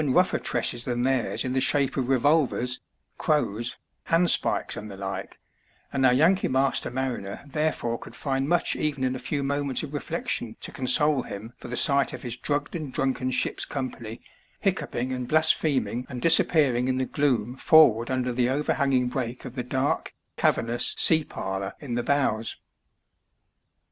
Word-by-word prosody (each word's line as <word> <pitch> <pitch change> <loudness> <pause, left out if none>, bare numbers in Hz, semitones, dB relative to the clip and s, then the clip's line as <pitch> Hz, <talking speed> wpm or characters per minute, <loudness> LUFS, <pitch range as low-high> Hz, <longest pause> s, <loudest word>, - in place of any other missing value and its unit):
283 140 -4 +1 0.2
rougher - - -20
tresses 120 -1 0
than 120 -1 -2
theirs 130 -2 0
in 130 - -2
the 130 - +1
shape 140 -1 +2
of 130 -2 -2
revolvers, 135 -2 +1 0.4
crows, 120 -7 -1 0.3
handspikes, 170 0 +2
and 105 - -7
the 100 - -9
like, 95 0 -6 0.6
and 135 -1 0
oar 130 - +6
Yankee 165 +9 +3
master 135 +1 +1
mariner 120 -6 -4
therefore 140 -5 -2
could - - -11
find 135 0 -2
much 175 0 +1
even 145 -3 -2
in 130 0 0
a - - -5
few 140 +3 -3
moments 140 0 -1
of 150 -1 -7
reflection 145 -6 -3
to - - -5
console 140 +2 +3
him 110 +2 -8
for - - -9
the 125 - -5
sight 140 +1 +3
of - - -8
his 120 -2 -3
drugged 145 +5 -3
and 155 -5 -5
drunken 130 -1 -1
ship's 125 - -1
company 120 -5 -6 0.4
hiccoughing 125 +2 -2
and 125 -1 -4
blasphem 155 -2 +4
ing 125 +2 -5
and 130 -2 -6
disappearing 140 -4 +4
in 130 0 0
the 130 - 0
gloom 125 -5 0
forward 130 -6 +5
under 125 -1 -1
the 125 0 +1
overhanging 135 -2 +1
break 125 0 -4
of 125 - -7
the 130 - -3
dark, 130 +3 -2 0.2
cavernous 120 +1 +1
sea 160 -1 +5
parlour 95 -6 -5
in 135 -5 -6
the 120 - 0
bows. 120 -4 0
130 Hz, 170 wpm, -25 LUFS, 120-145 Hz, 0.6 s, oar